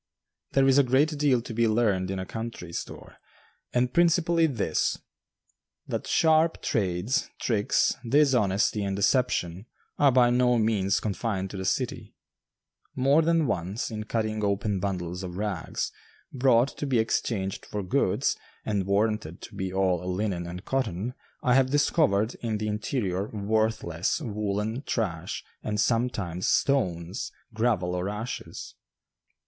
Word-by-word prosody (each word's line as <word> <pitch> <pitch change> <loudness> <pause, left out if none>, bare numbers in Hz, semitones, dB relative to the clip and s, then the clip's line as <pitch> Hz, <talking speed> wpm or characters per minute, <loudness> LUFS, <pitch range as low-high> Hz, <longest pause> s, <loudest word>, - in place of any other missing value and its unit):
There 135 0 +4
is 135 +1 +5
a - - +6
great 140 +5 +2
deal 140 -5 +2
to 115 - -7
be 115 +1 +2
learned 105 -5 +1
in 95 - -2
a 95 - -3
country 110 -6 -6
store, - - -7 0.5
and 125 0 +1
principally 170 -1 +3
this 115 - 0 0.9
that - - -4
sharp 160 0 +3
trades, 100 +1 0
tricks, 105 -4 +2 0.2
dishonesty, 110 -8 +3
and 100 -1 -1
deception 100 -3 +1 0.3
are 145 -2 +6
by 120 -1 +5
no 125 0 +3
means 105 -4 +2
confined 100 -2 -2
to 100 - -6
the 95 - -4
city. - - -2 0.8
More 135 +4 +4
than 165 0 +2
once, 95 0 -2
in 110 -1 -5
cutting 110 -1 -1
open 100 0 0
bundles 90 -2 -3
of 90 -1 -6
rags, 100 -5 -3 0.4
brought 130 -1 +4
to 145 - -2
be 130 -3 +2
exchanged 105 -3 -1
for 105 -1 -4
goods, 90 - +1 0.3
and 100 -3 -1
warranted 100 -4 0
to - - -10
be 95 -1 -3
all 90 -1 0
linen 90 -3 -2
and 90 +2 -7
cotton, 125 -4 -1 0.3
I 125 - +3
have 130 0 +4
discovered 140 -6 +2
in 110 -2 -1
the 110 +1 -3
interior 105 -3 -2
worthless 110 - 0
woolen 105 -2 -2
trash 90 - -3 0.2
and 105 -1 -2
sometimes 105 -6 0
stones, 90 -10 0 0.2
gravel 110 -6 +1
or 90 +2 -2
ashes. 105 +4 -6
110 Hz, 140 wpm, -27 LUFS, 95-125 Hz, 0.9 s, a